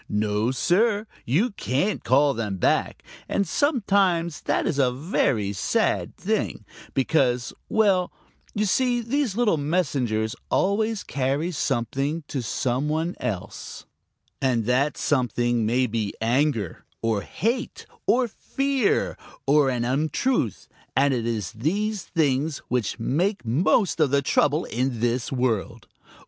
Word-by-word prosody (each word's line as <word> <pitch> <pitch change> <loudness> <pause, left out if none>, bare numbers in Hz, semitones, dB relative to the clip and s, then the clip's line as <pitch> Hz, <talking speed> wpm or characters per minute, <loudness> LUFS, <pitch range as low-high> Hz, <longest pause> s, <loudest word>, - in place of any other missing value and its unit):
No, 105 +2 0
Sir, 205 - +2 0.2
you 185 - +2
can't 185 +2 -1
call 140 +2 +4
them 105 -5 -3
back, - - +1 0.3
and 200 -2 0
sometimes 195 - +1
that 145 - 0
is 145 - 0
a 130 -2 +3
very 125 - 0
sad 95 - 0
thing, - - -2 0.3
because 130 -3 +1 0.2
well, 195 -5 +3 0.4
you 210 0 +1
see 245 +4 +2
these 240 -2 -1
little 225 -8 +3
messengers 135 -9 0
always 215 +2 +1
carry 140 +5 -1
something 135 +2 -1
to 135 - -2
some 125 +5 -1
one 160 +3 -1
else, 100 -1 -5 0.6
and 125 -5 +1
that 130 +5 +1
something 120 -4 +1
may 125 +3 +2
be 110 -3 -2
anger 115 - 0 0.2
or 110 -3 +1
hate 235 - -2 0.2
or 245 0 +3
fear 270 +1 0 0.3
or 140 0 +4
an 120 -2 -1
untruth, 145 - 0 0.3
and 140 +1 +3
it 120 -2 -1
is 110 -6 -2
these 195 - -1
things 150 -2 0
which 125 -4 -1
make 175 - 0
most 170 - +2
of 155 -3 +4
the 140 +1 +2
trouble 145 +4 +2
in 125 0 -2
this 120 +1 0
world. 125 -6 -1
140 Hz, 130 wpm, -24 LUFS, 120-185 Hz, 0.6 s, call